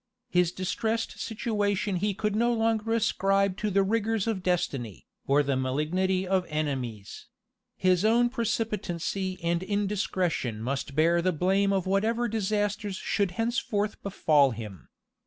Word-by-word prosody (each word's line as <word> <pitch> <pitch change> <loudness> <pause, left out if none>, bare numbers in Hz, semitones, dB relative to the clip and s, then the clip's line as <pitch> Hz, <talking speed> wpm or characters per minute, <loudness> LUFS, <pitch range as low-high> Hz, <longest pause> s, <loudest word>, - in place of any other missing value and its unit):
His 180 -1 +3
distressed 220 +5 -2
situation 205 -4 -1
he 205 +1 -1
could 210 0 -1
no 235 +2 +2
longer 225 -1 0
ascribe 195 -3 +2
to 210 - -1
the 195 0 +3
rigors 225 0 0
of 220 -5 -1
destiny, 140 - -2 0.2
or 145 +2 +4
the 140 -1 0
malignity 170 +9 0
of 190 0 +2
enemies: 130 -9 -4 0.5
his 185 0 +2
own 235 +3 +4
precipitancy 205 -6 -2
and 170 0 +1
indiscretion 190 - -1
must 135 +4 -3
bear 170 +3 +3
the 185 +1 +2
blame 190 +4 +2
of 195 -2 0
whatever 220 +5 +1
disasters 205 -1 -1
should 200 +1 0
henceforth 225 -3 -1
befall 150 -7 +3
him. 105 -6 -8
195 Hz, 135 wpm, -28 LUFS, 170-215 Hz, 0.5 s, or